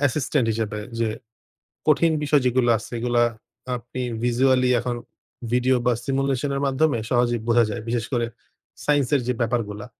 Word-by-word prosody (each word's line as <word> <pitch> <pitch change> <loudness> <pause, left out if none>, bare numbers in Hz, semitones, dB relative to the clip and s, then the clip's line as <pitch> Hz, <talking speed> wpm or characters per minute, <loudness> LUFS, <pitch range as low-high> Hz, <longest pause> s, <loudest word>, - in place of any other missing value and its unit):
Assistant 140 -2 +1
হিসেবে 105 -1 -2 0.2
যে 115 -1 +1 0.8
কঠিন 160 +2 +4
বিষয় 145 -1 +3
যেগুলো 125 -1 +2
আছে 110 - -10
এগুলো 120 0 +1 0.6
আপনি 120 +2 -7 0.2
ভিজুয়ালি 125 +1 +3
এখন 120 0 -2 0.6
ভিডিও 125 +1 +3
বা 125 - +4
সিমুলেশন 135 0 0
এর 140 - -1
মাধ্যমে 135 0 +2
সহজেই 120 -2 +2
বোঝা 120 0 +5
যায়। 105 - -4
বিশেষ 115 0 -1
করে 120 -1 +1 0.6
সাইন্স 145 -3 +3
এর 135 - +2
যে 125 - +2
ব্যাপারগুলা 115 -3 -2
125 Hz, 150 wpm, -23 LUFS, 120-135 Hz, 0.8 s, বোঝা